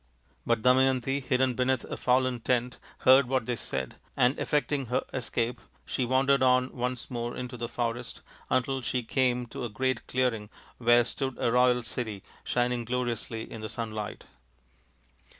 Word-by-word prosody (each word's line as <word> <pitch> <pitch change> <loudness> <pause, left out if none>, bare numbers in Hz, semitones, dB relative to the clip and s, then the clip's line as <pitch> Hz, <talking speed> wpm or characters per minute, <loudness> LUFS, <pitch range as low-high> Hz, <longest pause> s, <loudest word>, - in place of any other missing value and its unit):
But 115 -2 +1
Damayanti, 130 +1 +3
hidden 130 0 +2
beneath 130 +1 +1
a - - -5
fallen 125 -1 +2
tent, 125 +1 0 0.2
heard 130 0 +6
what 130 -2 0
they 125 - -1
said, 65 - -4 0.2
and 125 +3 +3
effecting 145 -2 0
her 125 +2 0
escape 120 -1 -2 0.2
she 130 - -1
wandered 135 +2 +3
on 125 0 +3
once 125 0 -3
more 120 -1 -3
into 125 0 -5
the 120 -1 -4
forest, 120 0 -3 0.3
until 135 +1 +1
she 125 0 -1
came 125 +1 +1
to - - -6
a 120 - -2
great 130 +5 -1
clearing 120 -5 0 0.3
where 120 0 +5
stood 135 +2 -3
a 115 - +1
royal 125 0 +4
city 110 -4 -5 0.2
shining 120 -1 0
gloriously 120 -2 -2
in 115 - -7
the 110 - -5
sunlight. 110 -2 -5
125 Hz, 155 wpm, -28 LUFS, 120-130 Hz, 0.3 s, heard